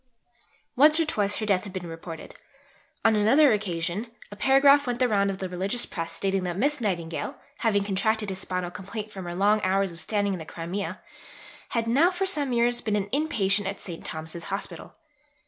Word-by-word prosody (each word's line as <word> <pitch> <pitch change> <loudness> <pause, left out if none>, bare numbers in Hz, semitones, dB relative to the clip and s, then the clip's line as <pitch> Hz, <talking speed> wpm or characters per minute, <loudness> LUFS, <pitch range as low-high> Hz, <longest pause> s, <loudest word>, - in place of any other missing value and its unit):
Once 305 +4 +6
or 330 - +3
twice, 205 -8 0
her 215 - -3
death 195 -3 +2
had 200 -3 -9
been 185 -2 -5
reported. 165 -1 -8 0.7
On 225 -1 +5
another 245 +6 +5
occasion, 185 +1 -2 0.2
a - - -7
paragraph 275 +5 +5
went 245 -1 -1
the 255 - +3
round 200 -3 +2
of 195 - -3
the 190 - -4
religious 190 +6 -1
press 165 -2 -5
stating 195 -1 -1
that 180 -1 -3
Miss 285 +5 +1
Nightingale 170 -6 -2 0.2
having 205 -4 +2
contracted 210 +1 0
a - - -3
spinal 180 -1 -3
complaint 210 +3 -7
from 190 -3 -7
her 175 0 -5
long 205 +3 +3
hours 195 0 +1
of 170 - -8
standing 205 -1 0
in 185 - -4
the - - -6
Crimea, 170 +5 -5 0.7
had 230 -1 0
"now 275 +10 +4
for 370 +1 -2
some 295 -8 +1
years 240 0 +2
been 215 -2 -1
an 205 -1 -1
in 300 +4 +1
patient 200 -6 +1
at 200 +1 -4
St. 170 -3 -7
Thomas's 160 +1 -5
Hospital." 195 0 -5
200 Hz, 200 wpm, -26 LUFS, 185-235 Hz, 0.7 s, Once